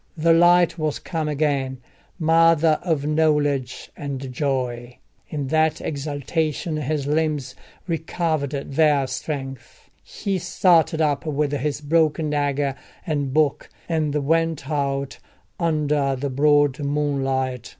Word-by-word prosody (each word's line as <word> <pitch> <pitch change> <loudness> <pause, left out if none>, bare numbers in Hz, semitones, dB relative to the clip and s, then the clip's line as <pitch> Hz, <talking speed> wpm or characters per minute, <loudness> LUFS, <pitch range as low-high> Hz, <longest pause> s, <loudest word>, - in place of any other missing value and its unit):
The 165 +1 +4
light 175 0 +4
was 155 -2 -1
come 160 -2 -3
again, 140 -3 0 0.4
mother 165 -1 +4
of 160 -5 -1
knowledge 150 -4 0
and 135 -2 -5
joy! 125 -3 -2 0.3
In 145 -3 -4
that 160 0 +2
exultation 155 +2 -2
his 150 -1 -2
limbs 150 -3 -1 0.3
recovered 160 -3 -1 0.2
their 145 -1 +3
strength: 135 -1 -6
he 195 -2 -3
started 170 -2 +3
up 150 +1 0
with 150 -1 0
his 145 +1 -2
broken 155 0 +1
dagger 145 -1 0 0.3
and 145 -5 -1
book, 150 0 +1 0.2
and 155 -3 -1
went 165 0 0
out 140 -2 -2 0.4
under 150 -4 +1
the 135 +1 -3
broad 145 +1 +3
moonlight. 135 -4 -1
150 Hz, 115 wpm, -22 LUFS, 140-160 Hz, 0.4 s, The